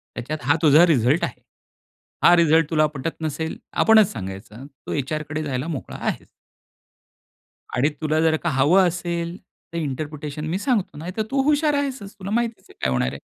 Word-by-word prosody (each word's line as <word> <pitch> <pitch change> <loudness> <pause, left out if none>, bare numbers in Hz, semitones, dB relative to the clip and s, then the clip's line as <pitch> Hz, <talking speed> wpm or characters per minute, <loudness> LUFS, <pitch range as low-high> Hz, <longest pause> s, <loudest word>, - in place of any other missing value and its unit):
त्याच्यात 135 +6 -4
हा 145 - +6
तुझा 155 +2 +7
रिझल्ट 140 +1 +3
आहे. - - -3 0.8
हा 175 - +8
रिझल्ट 165 -2 +4
तुला 155 -2 +3
पटत 150 +4 -5
नसेल. 160 +1 -3 0.2
आपणच 220 -3 +5
सांगायचं, 105 +4 -8
तू 140 -2 -11
एचआरकडे 155 +2 -3
जायला 135 0 -3
मोकळा 155 -5 -5
आहेस. - - -3 1.5
आणि 135 +5 +3
तुला 155 0 +1
जर 160 -1 +3
का 170 - +1
हवं 160 +8 +4
असेल, 170 0 -3 0.4
तर - - -3
इंटरप्रिटेशन 150 0 -4
मी 170 - -1
सांगतो 210 - -1
नाहीतर 180 +7 -4
तू 275 0 +2
हुशार 295 +1 +2
आहेसच 265 -8 -3
तुला 195 +1 -6
माहितीच 235 0 -2
काय 65 - -3
होणार 65 0 +1
आहे. 70 - -8
155 Hz, 160 wpm, -23 LUFS, 140-180 Hz, 1.5 s, हा